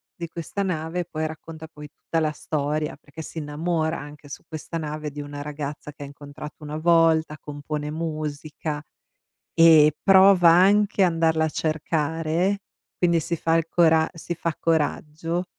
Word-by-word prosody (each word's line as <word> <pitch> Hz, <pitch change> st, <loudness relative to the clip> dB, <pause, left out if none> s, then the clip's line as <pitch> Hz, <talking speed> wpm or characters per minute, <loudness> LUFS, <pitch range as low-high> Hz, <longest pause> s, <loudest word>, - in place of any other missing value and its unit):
di 170 Hz, -1 st, -6 dB
questa 175 Hz, +4 st, -4 dB
nave. 170 Hz, -1 st, -2 dB
Poi 155 Hz, -2 st, -3 dB
racconta, 160 Hz, 0 st, -9 dB
poi, 150 Hz, -2 st, -11 dB
tutta 165 Hz, -, -3 dB
la 155 Hz, -1 st, +1 dB
storia 150 Hz, 0 st, -2 dB
perché 150 Hz, +2 st, -11 dB
si 160 Hz, -, -7 dB
innamora 160 Hz, +2 st, -1 dB
anche, 145 Hz, 0 st, -11 dB
su -, -, -8 dB
questa 160 Hz, +1 st, -6 dB
nave, 150 Hz, -1 st, -4 dB
di 150 Hz, -, -8 dB
una 145 Hz, 0 st, -7 dB
ragazza 150 Hz, 0 st, -6 dB
che 145 Hz, -, -9 dB
ha -, -, -6 dB
incontrato 145 Hz, +2 st, -10 dB
una 150 Hz, +1 st, -5 dB
volta, 160 Hz, -2 st, +3 dB
compone 150 Hz, 0 st, -5 dB
musica 155 Hz, -1 st, -4 dB, 0.8 s
e 155 Hz, -2 st, +7 dB
prova 190 Hz, -2 st, +7 dB
anche 200 Hz, +3 st, +4 dB
andarla 165 Hz, -2 st, +2 dB
a -, -, -1 dB
cercare, 160 Hz, +4 st, -1 dB, 0.4 s
quindi 170 Hz, -2 st, +3 dB
si 170 Hz, +2 st, -2 dB
fa 165 Hz, +1 st, +1 dB
il 165 Hz, -, 0 dB
cora 160 Hz, -2 st, +4 dB
si 170 Hz, +1 st, -5 dB
fa 165 Hz, -1 st, -2 dB
coraggio, 165 Hz, +2 st, -1 dB
160 Hz, 155 wpm, -24 LUFS, 150-165 Hz, 0.8 s, e